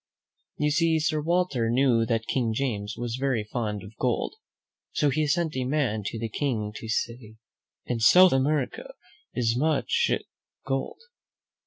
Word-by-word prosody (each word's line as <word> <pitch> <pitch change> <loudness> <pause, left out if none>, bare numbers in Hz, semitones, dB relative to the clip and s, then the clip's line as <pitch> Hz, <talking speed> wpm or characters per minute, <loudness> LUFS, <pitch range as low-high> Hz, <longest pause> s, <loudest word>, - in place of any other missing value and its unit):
You 150 0 +1
see, 165 +1 +3
Sir 155 0 0
Walter 160 -8 +1
knew 120 -2 +3
that 115 -1 0
King 120 -4 0
James 110 -6 -2
was 120 0 -3
very 130 -5 0
fond 105 -2 -3
of 100 +3 -12
gold; 125 -2 -1 0.6
so 145 -2 +2
he 155 +2 +1
sent 165 +1 0
a 130 - -1
man 130 -5 0
to - - -4
the 115 0 -3
King 110 -4 -2
to 110 - -8
say, 115 -1 -3 0.5
"In 120 -2 -2
South 180 +10 +7
America 135 0 -1 0.4
is 115 -2 +1
much 150 +3 +1 0.6
gold. 135 - -2
130 Hz, 150 wpm, -26 LUFS, 115-150 Hz, 0.6 s, South